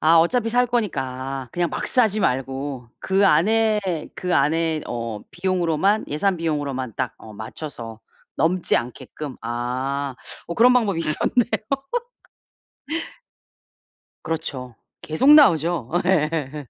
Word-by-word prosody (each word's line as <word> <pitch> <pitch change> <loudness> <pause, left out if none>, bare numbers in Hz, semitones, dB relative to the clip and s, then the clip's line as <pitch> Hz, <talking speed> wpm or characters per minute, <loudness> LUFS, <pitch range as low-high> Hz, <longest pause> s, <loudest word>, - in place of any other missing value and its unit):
아 160 +2 +5
어차피 225 +8 +2
살 245 +2 +3
거니까 135 - -2
그냥 175 +3 -1
막 - - -3
사지 220 -5 +2
말고 135 -2 -2
그 195 +1 +3
안에 215 +6 +3 0.3
그 180 -1 -3
안에 160 +2 +2
어 115 -2 -4
비용으로만 185 +2 +1
예산 185 +6 0
비용으로만 145 -7 -2
딱 130 -3 -2
어 110 - -12
맞춰서 115 +1 -7 0.4
넘지 170 +4 +2
않게끔. 130 +3 -6
아. 130 +4 -2 0.3
어 170 - -4
그런 245 +5 +6
방법이 215 -8 +2
있었네요. 165 +9 +2 2.8
그렇죠. 140 -6 -4 0.3
계속 210 - +4
나오죠. 165 - +4 0.2
예. 150 -5 0
155 Hz, 230 characters per minute, -22 LUFS, 130-190 Hz, 2.8 s, 그런